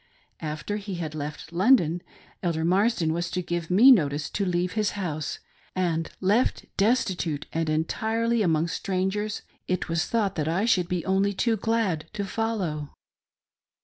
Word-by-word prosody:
After 155 +6 -3
he 200 -2 -5
had 160 -3 -4
left 150 +2 -6
London, 180 - +4 0.4
Elder 165 -3 0
Marsden 185 -2 +2
was 170 +1 -2
to 180 - -2
give 175 -1 -3
me 220 +9 +8
notice 150 - +2
to 200 - -1
leave 180 0 0
his 215 0 0
house; 155 -6 -3 0.4
and 165 -3 0
left 205 +6 +2
destitute, 185 - +1
and 165 -1 0
entirely 220 +9 0
among 165 -4 +2
strangers, 190 +5 -2 0.2
it 185 -2 -1
was 165 -1 +1
thought 210 -4 +1
that 150 -1 0
I 180 +6 +1
should 185 -7 +3
be 180 -3 -1
only 195 +1 +2
too 225 +3 +1
glad 215 -7 0
to 205 -1 -2
follow. 190 -9 -2
180 Hz, 150 wpm, -26 LUFS, 165-210 Hz, 0.4 s, me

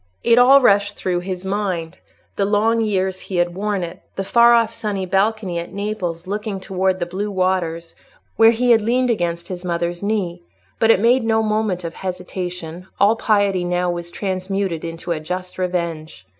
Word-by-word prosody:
It 235 0 +5
all 270 +3 +7
rushed 205 -3 +3
through 180 -1 -1
his 180 0 -5
mind—the 190 -1 -4
long 215 +3 +2
years 190 -3 -1
he 190 - -7
had 175 0 +1
worn 200 0 -2
it, 170 +2 -7
the 195 - -2
far 235 +4 +5
off 230 -1 +2
sunny 200 -4 -3
balcony 195 -1 0
at 170 - -7
Naples 190 -4 -4
looking 205 +1 -3
towards 190 0 0
the 175 - -2
blue 195 +4 -4
waters, 185 -3 -1 0.4
where 225 0 +7
he 240 +2 +2
had 225 -1 +5
leaned 245 +3 +1
against 170 -5 -2
his 180 -1 -6
mother's 175 0 -2
knee; 200 -4 -2 0.4
but 225 - +3
it 225 - +6
made 240 +3 +3
no 220 0 +2
moment 215 -4 -1
of 165 -1 -5
hesitation: 180 -2 -6
all 205 +3 +5
piety 200 -5 +1
now 180 0 0
was 175 0 -5
transmuted 190 -2 -3
into 165 +1 -5
a 165 - -1
just 180 +4 -6
revenge. 170 - -3
190 Hz, 175 wpm, -20 LUFS, 175-210 Hz, 0.4 s, all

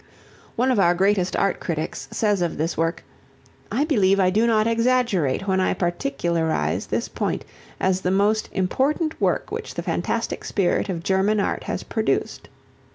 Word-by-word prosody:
One 255 +3 +2
of 240 - +2
our 175 -2 +4
greatest 190 0 +2
art 195 -2 +1
critics 160 -2 -4
says 205 -4 0
of 170 -2 -1
this 160 +3 -1
work, 165 +1 -1 0.7
"I 290 - +1
believe 200 - +3
I 185 -1 +3
do 220 +4 +2
not 220 -2 +3
exaggerate 230 - +1
when 190 -1 +2
I 185 - +1
particularize 175 - -1
this - - -1
point - - -3 0.3
as 190 0 +1
the 180 - 0
most 205 +3 +2
important 280 - 0
work - - 0
which - - -5
the - - -3
fantastic - - -2
spirit 195 0 0
of 170 -3 -3
German 195 +3 +2
Art 200 - -1
has - - -3
produced." - - -2
195 Hz, 160 wpm, -23 LUFS, 175-225 Hz, 0.7 s, our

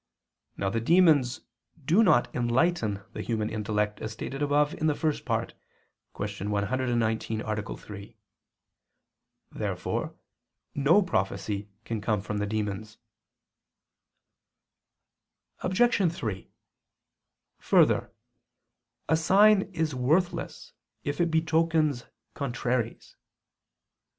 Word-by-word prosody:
Now 95 -1 -1
the 115 - -1
demons 155 -4 +4 0.4
do 175 +10 +4
not 185 - +3
enlighten 120 - +1
the - - -5
human 110 -2 -2
intellect, 105 -1 -1
as 110 - -4
stated 135 +6 -6
above 145 +1 +2
in 155 - -1
the 150 - +2
First 155 -1 -1
Part - - -1 0.6
(Q. 100 0 -4
119, 110 +1 0
A. 105 -2 -4
3). 105 +2 -11 1.3
Therefore - - -3 0.6
no 155 +9 +4
prophecy 100 - -2 0.2
can 115 -2 -3
come 105 -1 0
from 105 +1 -4
the 105 - -1
demons. 105 0 -3 2.6
Obj. 190 -2 +2
3: 110 - -5 1.1
Further, - - +3 1.0
a 160 - +3
sign 195 +5 +5
is 160 -4 -1
worthless 155 +8 -1 0.3
if 145 +4 -2
it 170 - +2
betokens 160 -4 +1 0.3
contraries. 125 -3 -3
120 Hz, 95 wpm, -27 LUFS, 105-160 Hz, 2.6 s, sign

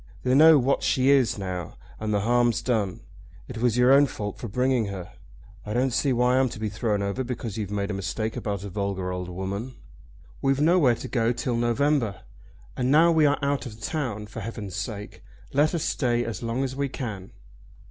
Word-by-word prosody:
They 125 - +1
know 155 +3 +8
what 135 +1 +1
she 130 +1 +3
is 135 -6 +3
now, 90 -4 -5 0.2
and 110 0 -2
the 105 -1 +1
harm's 120 +1 +2
done. 110 -7 -1 0.5
It 120 -2 -7
was 120 -1 +1
your 125 +2 +6
own 140 +1 +6
fault 105 -5 -6
for 120 - -5
bringing 125 +2 +1
her. 95 -3 -7 0.5
I 105 - -5
don't 125 0 +1
see 140 - +1
why 125 +1 +3
I'm 130 -1 +2
to 110 - -8
be 110 -1 -2
thrown 105 -1 -1
over 100 +6 -2
because 120 -4 -5
you've 105 -4 -4
made 100 0 -2
a - - -2
mistake 100 +3 -3
about 100 -2 -3
a 100 - -6
vulgar 95 -1 -3
old 90 0 -4
woman. 100 +7 -5 0.7
We've 135 0 +1
nowhere 155 -5 +4
to - - -7
go 115 -3 0
to 120 - +2
till 125 -2 -2
November, 120 -2 +1 0.5
and 125 0 0
now 160 +4 +6
we 160 -2 +4
are 145 - +2
out 140 -1 0
of 110 -2 -10
town 125 -9 -3
for 105 +2 -9
heaven's 105 -4 -6
sake 105 -4 -6 0.3
let 150 +4 +3
us 165 - -1
stay 120 -3 0
as 115 - -5
long 120 +3 -1
as 130 -1 -3
we 140 0 -1
can." 105 -8 -6
120 Hz, 210 wpm, -25 LUFS, 105-130 Hz, 0.7 s, know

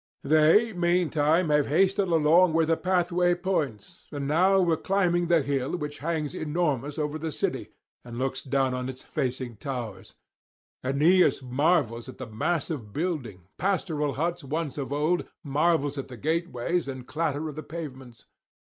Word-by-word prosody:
They 155 +10 +4
meantime 175 -2 +2
have 150 -1 +3
hasted 190 +5 +2
along 165 +1 +4
where 165 0 +3
the 165 +1 +2
pathway 180 0 +1
points, 160 - -3
and 140 -2 -4
now 185 +6 +4
were 170 -3 +3
climbing 175 -2 +1
the 170 -3 +3
hill 140 +3 -1
which 150 -2 -6
hangs 155 -2 -2
enormous 150 -3 -1
over 150 0 -2
the 160 0 -3
city, - - -2 0.3
and 120 -1 -9
looks 130 +1 -2
down 135 -1 0
on 125 0 -3
its 130 0 -8
facing 125 -3 -3
towers. 115 -9 -6 0.7
[421 145 +3 +3
456]Aeneas 125 - -10
marvels 130 -5 +1
at 130 - -10
the 130 - -6
mass 140 +10 -2
of 120 -10 -5
building, 140 - -3 0.2
pastoral 165 -7 0
huts 170 +3 -2
once 150 +1 -3
of 135 -2 -4
old, 155 +5 0 0.2
marvels 145 -1 +1
at 135 - -5
the 125 -2 -10
gateways 165 +2 -1
and 130 -2 -6
clatter 155 0 -2
of 150 - -7
the 155 - -5
pavements. 135 -7 -9
150 Hz, 160 wpm, -27 LUFS, 135-175 Hz, 0.7 s, They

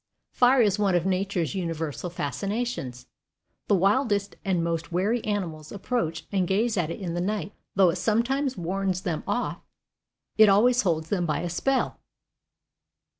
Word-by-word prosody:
Fire 250 +1 +4
is 205 -1 +1
one 195 -3 +2
of 175 0 +1
nature's 190 -3 0
universal 165 -3 -3
fascinations. 175 - -3 0.6
The 205 - +4
wildest 200 +1 +1
and 185 -4 0
most 165 0 -2
wary 205 +7 0
animals 170 -8 -3
approach 185 -6 -2
and 190 -3 +1
gaze 215 +5 +1
at 175 -5 0
it 165 - -5
in 180 -4 -4
the 175 - -1
night, 205 +1 -2
and - - -35 0.2
though 190 -3 +5
it - - -4
sometimes 255 +5 0
warns 185 +1 -1
them 170 -5 -3
off, 245 - -2 0.8
it 215 -1 +8
always 240 +5 +5
holds 160 -4 -1
them 180 -4 0
by 150 - 0
a 175 - -3
spell. 270 +9 0
195 Hz, 160 wpm, -26 LUFS, 170-215 Hz, 0.8 s, it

